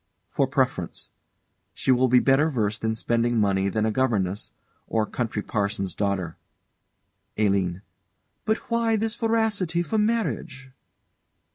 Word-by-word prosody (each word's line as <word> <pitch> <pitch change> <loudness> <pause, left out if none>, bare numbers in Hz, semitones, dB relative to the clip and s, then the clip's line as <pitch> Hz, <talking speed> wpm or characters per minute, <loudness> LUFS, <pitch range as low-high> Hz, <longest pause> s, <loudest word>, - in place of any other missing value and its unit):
For - - +1
preference. - - -1 0.6
She - - +1
will 130 +1 +4
be 125 0 +5
better 135 +5 +4
versed 110 -6 -1
in 110 0 0
spending 120 +1 +1
money 100 -1 +2
than 110 +2 0
a 110 - +1
governess, 105 -6 0 0.4
or 110 -1 +1
country 110 -2 -3
parson's 100 -3 -1
daughter. 100 -5 -2 1.0
ALINE. 95 -3 +1 0.6
But 220 +1 +1
why 230 -1 +2
this 220 +1 -1
voracity 220 -7 0
for 215 +6 -1
marriage? 210 - -1
120 Hz, 125 wpm, -25 LUFS, -, 1.0 s, be